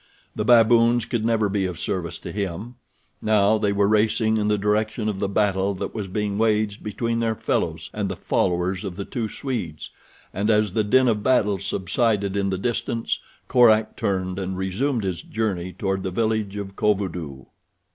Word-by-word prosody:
The 105 - -1
baboons 115 0 +5
could 120 -2 -2
never 110 -2 +2
be 100 -1 0
of 90 -2 -6
service 90 -3 -3
to - - -6
him. 100 +3 -4 0.5
Now 110 0 +3
they 105 - +1
were 100 0 +2
racing 110 +1 +2
in 105 -1 0
the 105 0 +2
direction 105 +2 0
of 105 -3 -2
the 100 - -1
battle 100 -1 +1
that - - -5
was 105 -3 -4
being 105 +1 -2
waged 110 -1 +1
between 115 +2 -2
their 115 -1 0
fellows - - -2
and - - -2
the - - -3
followers 90 +2 0
of 95 -4 -5
the 100 +1 -5
two 115 -5 -3
Swedes, 105 - -5 0.4
and 100 +3 -1
as 105 -3 +2
the 110 - +2
din 130 +5 +4
of 110 -3 +1
battle 105 -5 +2
subsided 100 +1 0
in 100 -1 0
the 95 - -1
distance, 115 +2 -2 0.3
Korak 110 -3 +4
turned 95 -1 -2
and 95 -1 -3
resumed 110 +6 -1
his 90 -3 -2
journey 95 -5 -2
toward 95 0 -2
the 95 - -2
village 110 0 -1
of 100 -1 -6
Kovudoo. 90 -10 -1
105 Hz, 180 wpm, -23 LUFS, 95-110 Hz, 0.5 s, baboons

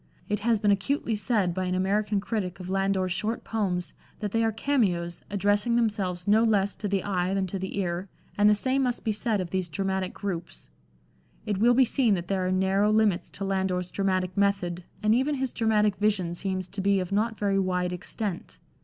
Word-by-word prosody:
It 210 -1 -1
has 230 +1 +2
been 205 0 +3
acutely 225 +4 0
said 205 -3 0
by 185 +1 -2
an 180 0 -1
American 205 +2 +1
critic 195 -4 -3
of 185 0 -6
Landor's 195 -1 +1
short 215 +5 -2
poems 180 -7 -2 0.3
that 210 -2 -3
they 225 +1 +1
are 225 - +2
cameos, 195 -9 0
addressing 205 +3 +1
themselves 200 -6 -1
no 215 +2 +5
less 205 -3 +2
to 210 - -3
the 195 -2 0
eye 185 -1 0
than 195 -1 +1
to 190 +1 -4
the 190 +1 -5
ear, 180 0 -2 0.3
and 205 0 +5
the 210 - +5
same 260 +5 +1
must 250 -2 -1
be 220 - +1
said 215 0 0
of 180 -2 -4
these 185 -2 -1
dramatic 190 +1 -2
groups. 170 - -6 0.7
It 205 -3 -1
will 240 +3 +5
be 260 +1 +6
seen 235 -4 +2
that 175 -1 -5
there 190 -2 0
are - - 0
narrow 190 +2 +2
limits 215 -4 +2
to 195 - -5
Landor's 190 -2 -1
dramatic 185 -2 0
method, 195 -4 0 0.2
and 215 +1 +4
even 270 +5 +2
his 265 -2 -2
dramatic 215 -3 +2
vision 200 -5 +1
seems 185 0 -3
to 200 - -4
be 200 0 +3
of 185 0 -4
not 220 +2 0
very 200 -1 +1
wide 180 -1 0
extent. 180 +1 -5
200 Hz, 205 wpm, -27 LUFS, 185-215 Hz, 0.7 s, be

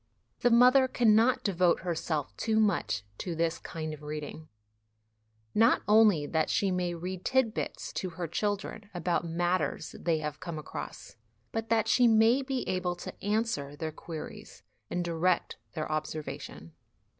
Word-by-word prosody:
The 245 - +3
mother 250 +3 +6
cannot 235 0 +3
devote 185 -3 +2
herself 160 -4 -2
too 220 -1 +1
much 105 - +1 0.2
to 175 -3 -3
this 165 0 0
kind 155 -2 -5
of 150 - -10
reading, 150 +1 -6 1.1
not 230 +3 +4
only 210 -8 +5
that 160 +1 0
she 200 -4 +1
may 180 -1 -1
read 180 +2 -5
tit 260 -4 +2
bits - - -4
to 185 - -3
her 170 0 -5
children 205 +4 -3
about 175 0 0
matters 175 +2 -1
they 165 -2 +1
have 150 -1 -4
come 170 -3 -5
across, 155 - -8 0.3
but 225 -1 -3
that 225 -1 +2
she 245 +1 +5
may 225 +3 +5
be 265 -1 -3
able 180 -1 -1
to 175 - -9
answer 205 -9 -1
their 155 +1 -4
queries 160 0 -9 0.3
and 175 0 -2
direct 170 +1 0 0.2
their 155 -2 -3
observation. 155 - -5
180 Hz, 150 wpm, -30 LUFS, 160-220 Hz, 1.1 s, mother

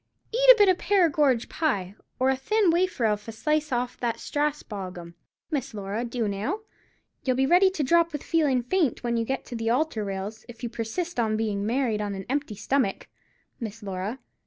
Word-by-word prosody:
Eat - - +3
a - - +9
bit 410 -2 +6
of 370 -2 +3
Perrigorge 300 - +3
pie, 200 - -1 0.2
or 260 +1 +3
a - - +1
thin 395 +7 +2
wafer 345 -8 +1
of 210 0 0
a - - -4
slice 300 +6 0
off 245 0 -2
that 235 -2 0
Strasbog 210 -11 -3
'am, 170 -1 -9 0.4
Miss 275 -5 -2
Laura, 205 +3 -3
do 235 -2 -2
now. 215 - -2 0.6
You'll 255 -2 +1
be 265 +1 +2
ready 360 +6 +5
to 375 -6 -2
drop 335 +4 +3
with 295 -2 -5
feelin' 290 -7 +2
faint 300 0 0
when 235 -1 0
you 230 -1 0
get 265 +3 -3
to 245 - -7
the 225 0 -1
altar 250 -3 +1
rails, 200 +2 -5
if 235 0 -12
you 240 - -2
persist 245 +9 -3
on 220 -2 +1
bein' 210 -2 -1
married 235 -3 0
on 205 -1 -3
a 190 -1 -6
empty 280 -5 -1
stummick, 210 0 -1 0.5
Miss 225 -1 -6
Laura. 195 +4 -4
245 Hz, 200 wpm, -26 LUFS, 215-305 Hz, 0.6 s, a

